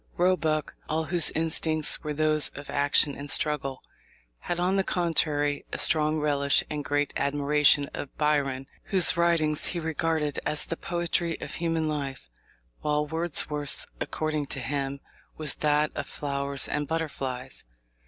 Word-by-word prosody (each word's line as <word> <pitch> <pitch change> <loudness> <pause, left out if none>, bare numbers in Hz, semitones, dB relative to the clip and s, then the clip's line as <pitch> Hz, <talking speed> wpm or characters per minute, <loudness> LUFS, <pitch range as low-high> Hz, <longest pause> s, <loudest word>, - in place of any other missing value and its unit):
Roebuck, 160 -4 +1 0.2
all 160 +1 0
whose 170 +1 +3
instincts 160 -1 0
were 150 - -3
those 155 -1 +3
of 145 0 -8
action 145 0 +3
and 145 0 -7
struggle, 140 -3 +1 0.6
had, 175 - -3
on 180 +2 +1
the 195 - +2
contrary, 155 -5 0
a - - -3
strong 155 0 +3
relish 140 -2 +3
and 150 -1 -3
great 145 0 -1
admiration 145 0 +3
of 140 - -7
Byron, 140 -3 0 0.2
whose 185 -3 +5
writings 165 -3 +1
he 175 - -3
regarded 160 -2 -1
as 150 - +1
the 165 - -3
poetry 170 -1 -2
of - - -7
human 165 -2 -1
life, 135 - -4 0.5
while 150 0 0
Wordsworth's, 150 -2 0
according 155 -2 -2
to 135 - -2
him, 140 +2 -3 0.4
was 155 -2 -2
that 150 0 +2
of - - -5
flowers 140 -1 -2
and 150 -1 -2
butterflies. 140 -6 -4
150 Hz, 145 wpm, -27 LUFS, 145-160 Hz, 0.6 s, whose